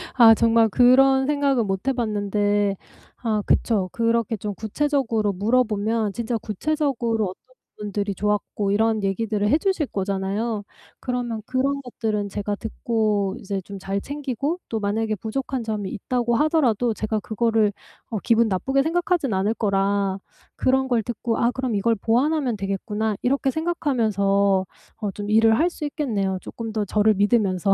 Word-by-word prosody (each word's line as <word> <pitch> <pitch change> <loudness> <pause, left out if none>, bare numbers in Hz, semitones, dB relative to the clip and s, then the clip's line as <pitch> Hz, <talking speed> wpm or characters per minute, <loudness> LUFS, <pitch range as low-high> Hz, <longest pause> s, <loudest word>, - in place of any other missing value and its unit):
아 230 -3 +8
정말 230 0 +4
그런 265 +4 +5
생각은 280 -6 +1
못 195 +5 -3
해 270 - +3
봤는데 205 -3 0 0.4
아 220 -3 -1
그쵸? 200 -6 +1
그렇게 230 -1 0
좀 205 +1 -4
구체적으로 225 -2 0
물어보면 215 0 +1
진짜 235 +3 -2
구체적으로 235 - -1
어떤 225 +7 -10 0.2
부분들이 205 -1 -3
좋았고 205 0 -1
이런 220 +1 +1
얘기들을 205 +1 0
해 295 - +4
주실 380 -4 0
거잖아요. 200 +3 -2 0.4
그러면 245 -3 -3
그런 275 +3 0
것들은 215 -5 -3
제가 205 +1 -3
듣고 215 -2 -1
이제 195 0 -3
좀 200 +2 -9
잘 195 +1 -2
챙기고 285 - -3
또 225 - -2
만약에 215 +2 -1
부족한 255 +4 -3
점이 210 -3 -3
있다고 240 +2 -1
하더라도 245 -7 +2
제가 215 0 -1
그거를 220 +1 +1 0.4
어 225 - -2
기분 230 0 +3
나쁘게 265 +8 +1
생각하진 345 - 0
않을 195 +3 +1
거라 200 -2 0 0.4
그런 265 0 +2
걸 240 -3 +1
듣고 235 0 -2
'아 235 - +2
그럼 255 -3 -2
이걸 230 +3 +2
보완하면 250 +4 +1
되겠구나.' 205 +2 -2
이렇게 270 +1 +1
생각하면서 210 - +1 0.4
어 205 -2 -1
좀 205 +1 -6
일을 220 +1 +5
할 330 - +4
수 340 - -9
있겠네요 220 - -1
쪼끔 225 -1 -7
더 215 -1 -1
저를 215 +2 +3
믿으면서. 200 -2 +2
220 Hz, 340 characters per minute, -23 LUFS, 205-250 Hz, 0.4 s, 아